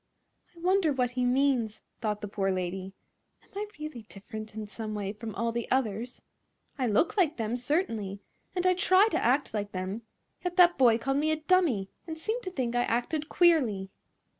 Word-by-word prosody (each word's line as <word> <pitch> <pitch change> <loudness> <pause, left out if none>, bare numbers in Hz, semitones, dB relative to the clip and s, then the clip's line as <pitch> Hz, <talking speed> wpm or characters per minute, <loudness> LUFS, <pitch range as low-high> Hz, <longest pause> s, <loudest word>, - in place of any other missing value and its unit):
"I - - -12
wonder 365 -2 +3
that 250 -2 0
he 250 0 -1
means," 250 -4 +1 0.2
thought 210 -2 -2
the 210 - -4
poor 195 -1 -1
lady. 185 +1 -3 0.5
"Am - - -27
I 415 +1 -3
really 305 -5 -6
different 215 +2 -8
in 215 -1 -4
some 215 +1 -6
way 200 -1 -3
from 220 -1 -7
all 230 0 0
the 235 0 -3
others? 245 -1 -1 0.5
I 260 -3 0
look 225 - +2
like 325 -5 +3
them, 225 0 -1
certainly; 235 - -1 0.4
and 360 0 0
I 370 - +5
try 375 +3 +5
to - - 0
act 260 +3 +2
like 205 -1 -3
them; 185 +4 -3 0.4
yet 360 -1 -2
that 355 -4 +6
boy 235 -4 +6
called 270 +4 -1
me 305 +2 +1
a 315 - +3
dummy 310 - +2 0.2
and 320 -1 -5
seemed 440 +9 -2
to 370 - -3
think 245 -7 -2
I 245 - +3
acted 290 +7 -1
queerly." 245 - +3
245 Hz, 190 wpm, -29 LUFS, 215-315 Hz, 0.5 s, that